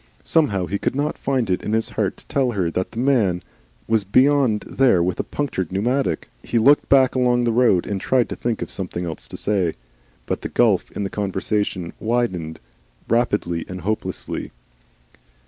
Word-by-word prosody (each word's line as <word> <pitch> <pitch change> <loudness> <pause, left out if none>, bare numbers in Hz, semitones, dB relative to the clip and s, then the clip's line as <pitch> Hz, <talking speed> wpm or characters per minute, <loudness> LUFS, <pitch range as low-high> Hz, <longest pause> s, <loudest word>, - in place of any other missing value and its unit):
Somehow 105 - +2
he 100 +2 -3
could - - -1
not 145 +2 -1
find 130 -4 -1
it 90 -1 0
in 105 - -3
his 110 0 +1
heart - - -2
to - - -16
tell 130 -3 0
her 90 -5 0
that 90 +2 -2
the - - -12
man 115 -9 +2 0.4
was 110 -2 +2
beyond 130 +1 +3
there 125 -10 +2
with 90 0 -1
a - - +1
punctured 110 - -3
pneumatic. 115 - 0
He 120 - -2
looked 140 +6 +4
back 135 -2 +5
along 125 -1 +2
the 120 - +2
road 115 -7 +3
and 100 -2 -3
tried 125 +2 +2
to - - -4
think 115 -2 -2
of - - -7
something 90 -2 -4
else 80 -2 -6
to - - -8
say. 95 -6 0 0.5
But - - -3
the - - -4
gulf - - +2
in 100 - -3
the 100 - -3
conversation 95 -2 -2
widened 95 -9 -1 0.5
rapidly 105 -8 0
and 90 0 -6
hopelessly. 105 +5 -3
110 Hz, 180 wpm, -22 LUFS, 95-125 Hz, 0.5 s, back